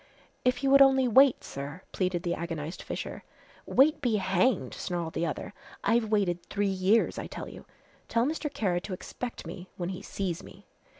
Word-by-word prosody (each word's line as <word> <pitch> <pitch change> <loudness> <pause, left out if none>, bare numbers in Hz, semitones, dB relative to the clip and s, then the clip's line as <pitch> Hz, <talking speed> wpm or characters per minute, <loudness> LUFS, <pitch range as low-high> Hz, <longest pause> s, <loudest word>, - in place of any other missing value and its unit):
"If 250 +1 +1
you 270 - +3
would 275 0 +8
only 265 -1 +6
wait, 265 +2 +5
sir," 145 +6 -7
pleaded 180 -2 -1
the 175 - 0
agonized 165 -1 -4
Fisher. - - -5 0.4
"Wait 295 +4 +4
be 240 -5 +2
hanged," 190 - +1
snarled 170 -2 -3
the 170 +1 0
other. 150 - -5 0.3
"I've 230 -1 +2
waited 190 -5 +1
three 205 0 -1
years, 195 +3 +2
I - - -5
tell - - -7
you. - - -11 0.4
Tell 230 +1 +2
Mr. 300 0 -2
Kara 180 -9 0
to 190 - -6
expect 240 +6 -6
me 180 0 -8
when 175 -1 -3
he 185 - -5
sees 185 -4 -3
me!" - - -14
195 Hz, 180 wpm, -29 LUFS, 175-250 Hz, 0.4 s, would